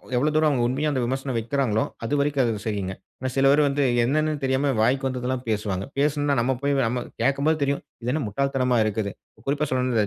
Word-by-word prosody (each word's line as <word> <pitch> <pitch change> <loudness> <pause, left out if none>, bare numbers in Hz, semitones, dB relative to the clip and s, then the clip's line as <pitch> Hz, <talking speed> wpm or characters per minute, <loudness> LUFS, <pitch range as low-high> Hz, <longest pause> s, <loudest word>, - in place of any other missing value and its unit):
எவ்வளவு 150 +5 +2
தூரம் 155 0 +4
அவங்க 130 -4 +1
உண்மையா 145 +5 0
அந்த 130 -3 0
விமர்சனம் 130 0 -2
வைக்கிறாங்களோ? 115 -2 0 0.2
அது 115 - -2
வரைக்கும் 140 -2 +2
அது 110 -3 -1
சரிங்க. 100 -3 -2 0.3
ஆனா, 130 0 -2
சில 135 - +2
பேர் 150 +1 +5
வந்து 140 0 +1 0.2
என்னன்னு 155 +4 +1
தெரியாம, 135 +1 +1
வாய்க்கு 135 +4 +2
வந்ததெல்லாம் 130 0 -2
பேசுவாங்க. 100 -3 -1
பேசினொன்ன, 145 -1 +1
நம்ம 130 +2 +1
போய் 140 0 +1
நம்ம 125 +1 -2 0.2
கேட்கும்போது 140 +5 +2
தெரியும், 140 0 0 0.2
இது 125 - 0
என்ன 155 - 0
முட்டாள் 140 +7 -1
தனமா 125 -2 +2
இருக்குது! 105 -1 -1 0.4
குறிப்பா 145 +2 +1
சொல்லணும் 125 -3 +1
130 Hz, 195 wpm, -24 LUFS, 120-140 Hz, 0.4 s, பேர்